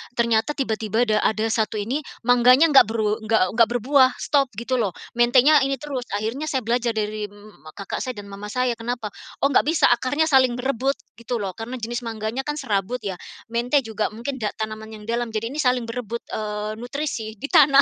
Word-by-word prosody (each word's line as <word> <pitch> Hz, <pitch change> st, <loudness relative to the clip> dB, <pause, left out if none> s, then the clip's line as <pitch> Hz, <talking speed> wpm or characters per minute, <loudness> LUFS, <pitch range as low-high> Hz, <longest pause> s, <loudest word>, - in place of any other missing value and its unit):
ternyata 235 Hz, +4 st, +1 dB
tiba-tiba 220 Hz, -3 st, 0 dB
da 215 Hz, -3 st, +2 dB
ada 220 Hz, 0 st, +1 dB
1 220 Hz, -1 st, 0 dB
ini 225 Hz, +8 st, -1 dB, 0.2 s
mangganya 250 Hz, +6 st, +5 dB
enggak 270 Hz, -7 st, +7 dB
beru 220 Hz, -1 st, 0 dB
enggak 215 Hz, -4 st, +1 dB
enggak 230 Hz, +1 st, +4 dB
berbuah, 260 Hz, +2 st, +4 dB
stop 280 Hz, -2 st, +2 dB
gitu 245 Hz, +3 st, -1 dB
loh. 200 Hz, -6 st, -1 dB, 0.2 s
Mentenya 255 Hz, +5 st, +6 dB
ini 275 Hz, -, 0 dB
terus 270 Hz, -2 st, -5 dB
akhirnya 230 Hz, +9 st, -3 dB
saya 265 Hz, -4 st, -1 dB
belajar 235 Hz, 0 st, 0 dB
dari 210 Hz, 0 st, -2 dB
mmm 205 Hz, 0 st, -17 dB, 0.2 s
mmm, 155 Hz, -, -12 dB
kakak 200 Hz, -, -5 dB
saya 255 Hz, -1 st, -4 dB
dan 200 Hz, -1 st, -9 dB
mama 200 Hz, +1 st, -7 dB
saya, 250 Hz, +3 st, 0 dB
kenapa, 230 Hz, -3 st, -4 dB, 0.3 s
"Oh, 280 Hz, -, +4 dB
enggak 280 Hz, -, +3 dB
bisa 320 Hz, -1 st, +4 dB
akarnya 260 Hz, +5 st, +2 dB
saling 260 Hz, -2 st, +5 dB
berebut," 265 Hz, +2 st, 0 dB, 0.2 s
gitu 235 Hz, +1 st, -4 dB
loh 190 Hz, -, -2 dB
karena 235 Hz, +3 st, -5 dB
jenis 240 Hz, 0 st, -4 dB
mangganya 220 Hz, +2 st, -4 dB
kan 295 Hz, -, -1 dB
serabut 230 Hz, -3 st, -2 dB
ya, 190 Hz, -3 st, -4 dB, 0.3 s
mente 245 Hz, +4 st, +1 dB
juga 220 Hz, -2 st, -2 dB
mungkin 240 Hz, +5 st, -6 dB
da 215 Hz, -, -1 dB
tanaman 220 Hz, 0 st, -5 dB
yang 210 Hz, -, -10 dB
dalam 235 Hz, -1 st, -1 dB
jadi 225 Hz, +2 st, -2 dB
ini 285 Hz, -, -7 dB
saling 250 Hz, -5 st, +1 dB
berebut, 235 Hz, -1 st, -4 dB
eee, 210 Hz, 0 st, -3 dB
nutrisi 245 Hz, -2 st, -4 dB
di 225 Hz, +7 st, -7 dB
tanah, 280 Hz, -4 st, +7 dB
235 Hz, 200 wpm, -23 LUFS, 215-260 Hz, 0.3 s, enggak